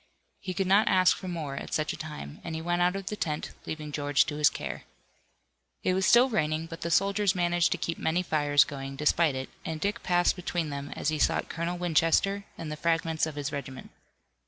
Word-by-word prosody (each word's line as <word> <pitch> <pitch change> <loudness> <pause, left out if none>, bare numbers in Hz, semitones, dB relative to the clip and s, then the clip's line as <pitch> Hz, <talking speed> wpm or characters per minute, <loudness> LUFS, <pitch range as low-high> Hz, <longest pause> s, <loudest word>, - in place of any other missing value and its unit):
He 185 -2 -5
could 195 - 0
not 200 +3 +4
ask 185 -3 +5
for 185 - -8
more 160 -6 -4
at - - -4
such 155 0 0
a - - -6
time, 110 - -8
and 165 -1 -5
he 160 - -4
went 175 +1 0
out 180 +1 +3
of 195 -1 -5
the 210 - -3
tent, 150 -7 -3 0.2
leaving 155 -1 -5
George 145 -1 +2
to 150 - -4
his 150 -1 +5
care. - - -6 1.0
It 185 - +2
was 190 0 +1
still 240 +2 +7
raining, 160 -9 0
but 165 0 -9
the 170 - -2
soldiers 200 +2 +2
managed 175 -1 +2
to - - -3
keep 165 - -3
many 170 +3 +1
fires 145 -4 +3
going, 135 0 -7
despite 150 +1 +2
it, 130 0 -4
and 160 -1 -4
Dick 205 +6 -1
passed 175 -1 +2
between 175 -3 -2
them 140 0 -5
as - - -1
he 155 -1 -2
sought - - +1
Colonel 170 +2 -3
Winchester, 175 +4 +2
and 160 -2 -6
the 150 - -5
fragments 165 -1 0
of 155 - -7
his 145 0 -3
regiment. 140 -3 -7
165 Hz, 220 wpm, -28 LUFS, 150-180 Hz, 1.0 s, still